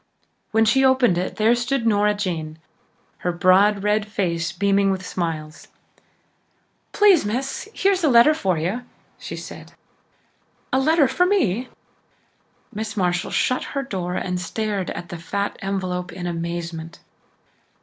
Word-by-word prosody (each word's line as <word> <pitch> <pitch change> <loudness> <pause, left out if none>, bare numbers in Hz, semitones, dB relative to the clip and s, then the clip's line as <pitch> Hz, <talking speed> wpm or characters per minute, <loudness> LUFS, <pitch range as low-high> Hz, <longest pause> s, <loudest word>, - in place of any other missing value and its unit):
When 220 +1 +3
she 265 +5 +3
opened 255 -9 +4
it 185 - -3
there 220 +2 +3
stood 240 +1 -1
Nora 210 -1 +3
Jane, 165 -6 -4 0.6
her 180 - -1
broad 190 +4 +3
red 210 0 +1
face 175 -5 -1
beaming 200 +2 +2
with 190 -1 -2
smiles. 160 -4 -4 1.2
"Please, 410 -5 +5
Miss, 255 - -3
here's 390 -4 +1
a - - +4
letter 240 +5 +6
for 190 - 0
you," 185 +10 -2 0.4
she - - -7
said. - - -10 1.0
"A 265 - +4
letter 305 +1 +4
for 310 +8 +2
me!" 250 - +1 1.0
Miss 220 0 -5
Marshall 180 -1 0
shut 255 - 0
her 275 - 0
door 180 -8 -4
and 180 -1 -2
stared 205 +1 -3
at 175 - -6
the 175 - -6
fat 200 +4 -3
envelope 185 -2 -3
in 180 -1 -7
amazement. 170 -1 -5
200 Hz, 140 wpm, -22 LUFS, 180-240 Hz, 1.2 s, letter